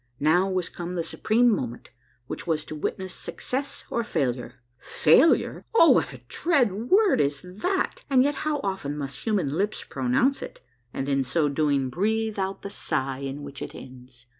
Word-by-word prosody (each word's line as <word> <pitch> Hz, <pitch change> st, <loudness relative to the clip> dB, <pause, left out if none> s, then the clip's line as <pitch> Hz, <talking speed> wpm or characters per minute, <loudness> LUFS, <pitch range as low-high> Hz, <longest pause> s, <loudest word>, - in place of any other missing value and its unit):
Now 175 Hz, +6 st, +3 dB
was 185 Hz, -2 st, -1 dB
come 175 Hz, +1 st, -6 dB
the 170 Hz, -, -1 dB
supreme 225 Hz, +8 st, +2 dB
moment 120 Hz, -7 st, -6 dB, 0.3 s
which -, -, -6 dB
was 155 Hz, -2 st, 0 dB
to 155 Hz, -, -7 dB
witness 185 Hz, +4 st, -3 dB
suecess 275 Hz, +3 st, -4 dB
or 235 Hz, -, 0 dB
failure. 125 Hz, -, -2 dB, 0.2 s
Failure! 165 Hz, -, +3 dB
Oh, 335 Hz, -7 st, +8 dB
what -, -, +3 dB
a -, -, -11 dB
dread 280 Hz, -, +2 dB, 0.2 s
word 400 Hz, -, +5 dB
is 140 Hz, -1 st, -1 dB
that! 360 Hz, -, -2 dB
and 260 Hz, -2 st, +5 dB
yet 285 Hz, 0 st, 0 dB
how 305 Hz, -2 st, -1 dB
often 190 Hz, -8 st, -3 dB
must 135 Hz, -2 st, -5 dB
human 190 Hz, -11 st, +1 dB
lips 200 Hz, +6 st, -1 dB
pronounce 135 Hz, -, +1 dB
it, -, -, -8 dB, 0.3 s
and 135 Hz, -, -4 dB
in 135 Hz, -1 st, +2 dB
so 145 Hz, +4 st, +1 dB
doing 140 Hz, -3 st, +1 dB
breathe 220 Hz, -, 0 dB
out 190 Hz, 0 st, -3 dB
the 200 Hz, -, -5 dB
sigh 135 Hz, -7 st, -2 dB
in 140 Hz, +1 st, -5 dB
which 140 Hz, -1 st, -8 dB
it -, -, -6 dB
ends 125 Hz, -1 st, -12 dB
170 Hz, 175 wpm, -26 LUFS, 140-220 Hz, 0.3 s, Oh